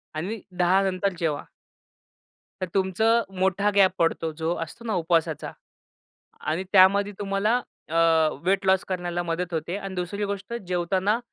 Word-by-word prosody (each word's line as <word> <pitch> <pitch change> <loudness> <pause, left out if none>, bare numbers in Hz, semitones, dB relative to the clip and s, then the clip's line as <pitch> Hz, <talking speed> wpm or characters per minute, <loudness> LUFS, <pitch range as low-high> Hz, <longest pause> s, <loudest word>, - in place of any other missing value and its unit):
आणि 195 +7 -4 0.2
10 180 +2 +4
नंतर 190 0 0
जेवा. 155 -4 -1 1.2
तर 185 - -1
तुमचं 220 +5 +2 0.2
मोठा 190 +2 +2
गॅप 195 -2 +6
पडतो 165 -1 +1
जो 165 +1 0
असतो 230 +9 -12
ना 220 - -1
उपवासाचा 165 -1 0 1.0
आणि 175 +4 -1
त्यामध्ये 200 +1 +5
तुम्हाला 205 +4 +1 0.3
अ, 160 - -7 0.5
वेट 195 +2 +1
लॉस 190 0 +3
करण्याला 175 -1 -2
मदत 170 +1 -3
होते 160 +3 -2
अन् 195 -2 -6
दुसरी 180 +4 -3
गोष्ट 200 +3 -5
जेवताना 185 +4 +1
190 Hz, 140 wpm, -25 LUFS, 175-200 Hz, 1.2 s, गॅप